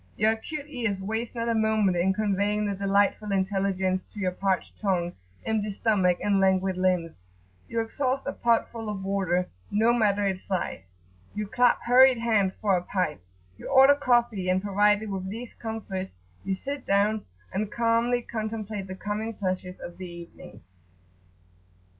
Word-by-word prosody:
Your 215 Hz, +1 st, +3 dB
acute 280 Hz, +7 st, -5 dB
ears 230 Hz, -9 st, -2 dB
waste 220 Hz, +5 st, -3 dB
not 230 Hz, 0 st, -2 dB
a 230 Hz, -, +2 dB
moment 220 Hz, -4 st, +2 dB
in 175 Hz, +2 st, +2 dB
conveying 205 Hz, +1 st, 0 dB
the 200 Hz, -, -1 dB
delightful 200 Hz, +1 st, +1 dB
intelligence 190 Hz, -1 st, 0 dB
to 210 Hz, -, -11 dB
your 185 Hz, -2 st, 0 dB
parched 190 Hz, +1 st, -2 dB
tongue, 180 Hz, -4 st, 0 dB, 0.3 s
empty 215 Hz, -1 st, 0 dB
stomach, 195 Hz, -4 st, +2 dB
and 200 Hz, -1 st, +2 dB
languid 190 Hz, 0 st, +2 dB
limbs. 180 Hz, -, 0 dB, 0.5 s
You 230 Hz, -, 0 dB
exhaust 260 Hz, +4 st, -2 dB
a -, -, -2 dB
pot 235 Hz, -1 st, +1 dB
full 225 Hz, -2 st, -6 dB
of 200 Hz, -2 st, -4 dB
water, 190 Hz, -2 st, 0 dB, 0.2 s
no 225 Hz, +3 st, +3 dB
matter 205 Hz, -3 st, +2 dB
its 190 Hz, -1 st, -2 dB
size. 95 Hz, -, -4 dB, 0.4 s
You 210 Hz, 0 st, -2 dB
clap 245 Hz, +4 st, +2 dB
hurried 255 Hz, +1 st, +6 dB
hands[FN#9] 215 Hz, -5 st, +1 dB
for 200 Hz, -3 st, +1 dB
a 180 Hz, -, 0 dB
pipe; 175 Hz, -, -2 dB, 0.4 s
you -, -, -8 dB
order 270 Hz, +1 st, +7 dB
coffee; 240 Hz, -8 st, +1 dB
and 185 Hz, 0 st, +3 dB
provided 205 Hz, +1 st, +2 dB
with 190 Hz, -1 st, -4 dB
these 230 Hz, +4 st, -7 dB
comforts, 200 Hz, -4 st, -5 dB, 0.3 s
you 195 Hz, -, -1 dB
sit 280 Hz, +6 st, -6 dB
down, 205 Hz, +2 st, +2 dB, 0.3 s
and 210 Hz, +2 st, -2 dB
calmly 235 Hz, +1 st, +1 dB
contemplate 215 Hz, -3 st, -4 dB
the 185 Hz, -, -6 dB
coming 210 Hz, +3 st, -4 dB
pleasures 185 Hz, -2 st, -3 dB
of 175 Hz, -, -9 dB
the 185 Hz, -1 st, -6 dB
evening. 170 Hz, -11 st, -11 dB
205 Hz, 160 wpm, -27 LUFS, 190-225 Hz, 0.5 s, order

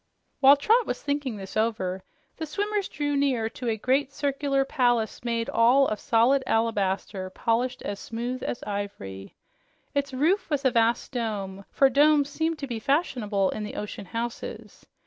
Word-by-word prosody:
While 275 Hz, +1 st, +8 dB
Trot 455 Hz, -, +3 dB
was -, -, -2 dB
thinking 285 Hz, -5 st, -2 dB
this 195 Hz, -1 st, -9 dB
over, 215 Hz, -4 st, 0 dB, 0.4 s
the 320 Hz, -, -4 dB
swimmers 410 Hz, +4 st, -1 dB
drew 290 Hz, -1 st, -2 dB
near 260 Hz, -6 st, +1 dB
to 245 Hz, -2 st, -4 dB
a 220 Hz, -, 0 dB
great, 260 Hz, +5 st, +1 dB
circular 275 Hz, -1 st, 0 dB
palace 240 Hz, -6 st, +1 dB
made 230 Hz, -1 st, -1 dB
all 250 Hz, +4 st, +4 dB
of 215 Hz, -, -2 dB
solid 245 Hz, +4 st, +3 dB
alabaster 200 Hz, -4 st, 0 dB
polished 240 Hz, +6 st, -1 dB
as 200 Hz, -1 st, -4 dB
smooth 240 Hz, +3 st, -4 dB
as 240 Hz, -, -4 dB
ivory. 200 Hz, -, -6 dB, 0.6 s
Its 280 Hz, -1 st, -1 dB
roof 320 Hz, +10 st, +1 dB
was 290 Hz, -2 st, -1 dB
a 260 Hz, -, +5 dB
vast 230 Hz, 0 st, +1 dB
dome, 200 Hz, -6 st, -4 dB
for 275 Hz, -, +4 dB
domes 290 Hz, +2 st, +4 dB
seemed 320 Hz, +2 st, -1 dB
to 285 Hz, -, -4 dB
be 235 Hz, -4 st, -4 dB
fashionable 220 Hz, -, +1 dB
in 215 Hz, -, -4 dB
the 210 Hz, -, -6 dB
ocean 210 Hz, -1 st, -6 dB
houses. 235 Hz, +2 st, -6 dB
245 Hz, 165 wpm, -26 LUFS, 215-280 Hz, 0.6 s, While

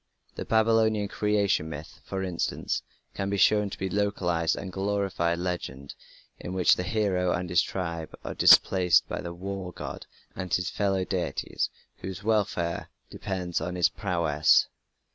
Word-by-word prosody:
The -, -, -6 dB
Babylonian 110 Hz, -2 st, +2 dB
Creation 100 Hz, -7 st, +1 dB
Myth, 75 Hz, 0 st, -9 dB
for 95 Hz, 0 st, -4 dB
instance, 90 Hz, -3 st, -2 dB, 0.3 s
can 95 Hz, -, -3 dB
be 100 Hz, -, -1 dB
shown 105 Hz, +2 st, +4 dB
to -, -, -8 dB
be 95 Hz, -, -3 dB
a 95 Hz, -, -3 dB
localized 90 Hz, -5 st, 0 dB
and 95 Hz, -, -6 dB
glorified 95 Hz, -4 st, 0 dB
legend 85 Hz, -7 st, -4 dB, 0.5 s
in 90 Hz, -, -6 dB
which 95 Hz, -2 st, +4 dB
the -, -, -3 dB
hero 90 Hz, -1 st, 0 dB
and 90 Hz, 0 st, -2 dB
his 90 Hz, 0 st, +5 dB
tribe 85 Hz, -4 st, -4 dB
are -, -, -4 dB
displaced 90 Hz, -2 st, +5 dB
by -, -, -4 dB
the 85 Hz, -, -6 dB
war 95 Hz, 0 st, -5 dB
god -, -, -7 dB, 0.3 s
and 95 Hz, -1 st, -5 dB
his 90 Hz, -, 0 dB
fellow 95 Hz, -2 st, 0 dB
deities 90 Hz, -7 st, -2 dB, 0.3 s
whose 95 Hz, +1 st, -7 dB
welfare 100 Hz, -6 st, 0 dB, 0.2 s
depends 90 Hz, -3 st, -3 dB
on 90 Hz, +2 st, -3 dB
his 90 Hz, -, +3 dB
prowess. 85 Hz, -6 st, +2 dB
95 Hz, 155 wpm, -27 LUFS, 85-100 Hz, 0.5 s, his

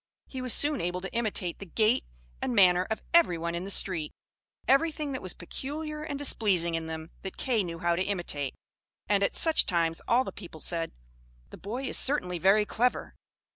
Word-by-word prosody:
He 260 Hz, -, -7 dB
was 255 Hz, -1 st, 0 dB
soon 290 Hz, +1 st, +4 dB
able 180 Hz, +1 st, -2 dB
to 190 Hz, -, -7 dB
imitate 215 Hz, -7 st, -2 dB
the 200 Hz, -, -7 dB
gait 220 Hz, +7 st, +2 dB, 0.4 s
and 245 Hz, -, -1 dB
manner 180 Hz, -2 st, +5 dB
of 220 Hz, -, -3 dB
everyone 170 Hz, -, +3 dB
in 170 Hz, +2 st, -3 dB
the -, -, -6 dB
street. 180 Hz, -6 st, +2 dB, 0.6 s
Everything 300 Hz, +1 st, +2 dB
that 260 Hz, -, -4 dB
was 185 Hz, -, -4 dB
peculiar 300 Hz, -, -6 dB
and 295 Hz, -2 st, -4 dB
displeasing 200 Hz, -11 st, +1 dB
in 165 Hz, 0 st, -3 dB
them 160 Hz, 0 st, -7 dB
that 190 Hz, -, -7 dB
Kay 235 Hz, -6 st, +1 dB
knew 170 Hz, -2 st, -5 dB
how 170 Hz, 0 st, +1 dB
to 175 Hz, -, -1 dB
imitate: 175 Hz, -8 st, -2 dB, 0.5 s
and 200 Hz, 0 st, +2 dB
at 200 Hz, -, +1 dB
such 325 Hz, -1 st, +4 dB
times 165 Hz, -2 st, 0 dB
all 245 Hz, +2 st, +4 dB
the -, -, -6 dB
people 175 Hz, -5 st, -11 dB
said, 165 Hz, +1 st, +1 dB, 0.6 s
"The -, -, -10 dB
boy 235 Hz, +7 st, -5 dB
is 265 Hz, -, +1 dB
certainly 180 Hz, -11 st, 0 dB
very 195 Hz, +4 st, +4 dB
clever!" 245 Hz, +4 st, -1 dB
195 Hz, 190 wpm, -28 LUFS, 170-255 Hz, 0.6 s, manner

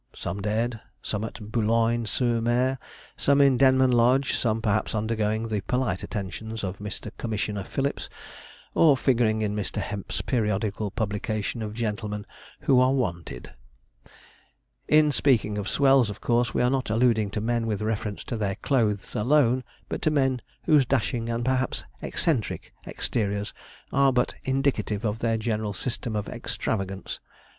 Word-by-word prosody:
Some 100 Hz, -, -4 dB
dead, 110 Hz, +2 st, -1 dB, 0.2 s
some 105 Hz, 0 st, -2 dB
at 110 Hz, -1 st, -7 dB
Boulogne 115 Hz, +1 st, +2 dB
sur 120 Hz, +1 st, +1 dB
Mer, 125 Hz, +3 st, +1 dB, 0.4 s
some 140 Hz, 0 st, +3 dB
in 140 Hz, -2 st, +6 dB
Denman 130 Hz, 0 st, +5 dB
Lodge, 125 Hz, +3 st, +3 dB
some 110 Hz, -2 st, +1 dB
perhaps 110 Hz, 0 st, 0 dB
undergoing 110 Hz, 0 st, 0 dB
the 105 Hz, -2 st, -1 dB
polite 125 Hz, -5 st, -1 dB
attentions 110 Hz, +3 st, -5 dB
of 95 Hz, 0 st, -4 dB
Mr. 105 Hz, +1 st, -6 dB
Commissioner 105 Hz, -3 st, -2 dB
Phillips, 140 Hz, +8 st, -2 dB, 0.6 s
or 150 Hz, -5 st, +5 dB
figuring 115 Hz, -5 st, +2 dB
in 105 Hz, -1 st, -1 dB
Mr. 105 Hz, -2 st, -2 dB
Hemp's 100 Hz, -2 st, -4 dB
periodical 105 Hz, -3 st, -1 dB
publication 110 Hz, 0 st, -2 dB
of 105 Hz, -1 st, -4 dB
gentlemen 105 Hz, -2 st, -3 dB, 0.4 s
'who 130 Hz, -2 st, +4 dB
are 130 Hz, +1 st, +4 dB
wanted.' 85 Hz, -, -3 dB, 1.3 s
In 150 Hz, 0 st, +5 dB
speaking 115 Hz, -8 st, +2 dB
of 100 Hz, -, -3 dB
'swells,' 135 Hz, -5 st, +4 dB
of 105 Hz, -, -7 dB
course 120 Hz, +1 st, +1 dB
we -, -, +1 dB
are 125 Hz, -, +3 dB
not 135 Hz, -3 st, 0 dB
alluding 110 Hz, -2 st, +3 dB
to 105 Hz, -, -3 dB
men 115 Hz, +1 st, 0 dB
with 105 Hz, -1 st, -1 dB
reference 105 Hz, -1 st, -2 dB
to 120 Hz, -, -4 dB
their 100 Hz, -3 st, -1 dB
clothes 110 Hz, -7 st, 0 dB
alone, 130 Hz, +1 st, +3 dB, 0.2 s
but -, -, -4 dB
to -, -, +3 dB
men 135 Hz, -4 st, +1 dB, 0.2 s
whose 150 Hz, -3 st, +5 dB
dashing, 120 Hz, -2 st, 0 dB
and 115 Hz, 0 st, -1 dB
perhaps 130 Hz, 0 st, 0 dB, 0.2 s
eccentric, 135 Hz, -, -1 dB
exteriors 105 Hz, -2 st, -2 dB, 0.4 s
are 140 Hz, 0 st, +5 dB
but 125 Hz, -1 st, +1 dB
indicative 130 Hz, -5 st, 0 dB
of 110 Hz, +1 st, -1 dB
their 115 Hz, -1 st, +1 dB
general 110 Hz, -2 st, -2 dB
system 120 Hz, +2 st, -3 dB
of 105 Hz, -, -2 dB
extravagance. 95 Hz, -2 st, -3 dB
115 Hz, 150 wpm, -26 LUFS, 105-130 Hz, 1.3 s, in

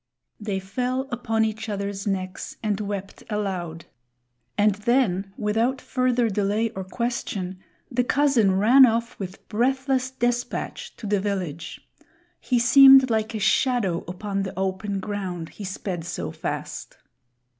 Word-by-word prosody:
They 205 Hz, -3 st, -2 dB
fell 250 Hz, +7 st, -2 dB
upon 225 Hz, -2 st, 0 dB
each 220 Hz, 0 st, -4 dB
other's 200 Hz, 0 st, -3 dB
necks 185 Hz, -1 st, -3 dB
and 210 Hz, -2 st, 0 dB
wept 200 Hz, -1 st, -5 dB
aloud. 185 Hz, -6 st, -3 dB, 0.7 s
And 210 Hz, 0 st, +4 dB
then, 205 Hz, -3 st, +1 dB
without 225 Hz, +5 st, 0 dB
further 250 Hz, -2 st, +1 dB
delay 210 Hz, +2 st, 0 dB
or 190 Hz, -, -5 dB
question, 190 Hz, -3 st, -3 dB, 0.3 s
the 250 Hz, 0 st, +2 dB
cousin 245 Hz, -8 st, +3 dB
ran 250 Hz, +6 st, +7 dB
off 230 Hz, +1 st, -1 dB
with 190 Hz, -1 st, -7 dB
breathless 260 Hz, +3 st, +1 dB
despatch 245 Hz, -1 st, -2 dB
to -, -, -9 dB
the 205 Hz, -1 st, +1 dB
village. 180 Hz, -5 st, -4 dB, 0.5 s
He 250 Hz, -, 0 dB
seemed 265 Hz, +1 st, +8 dB
like 220 Hz, 0 st, 0 dB
a -, -, -2 dB
shadow 215 Hz, -4 st, +2 dB
upon 195 Hz, +2 st, -3 dB
the 190 Hz, -1 st, -5 dB
open 195 Hz, +1 st, -2 dB
ground, 190 Hz, -5 st, -4 dB
he 210 Hz, -, -10 dB
sped 190 Hz, -2 st, -4 dB
so 175 Hz, +1 st, -4 dB
fast. -, -, -5 dB
210 Hz, 135 wpm, -24 LUFS, 195-240 Hz, 0.7 s, seemed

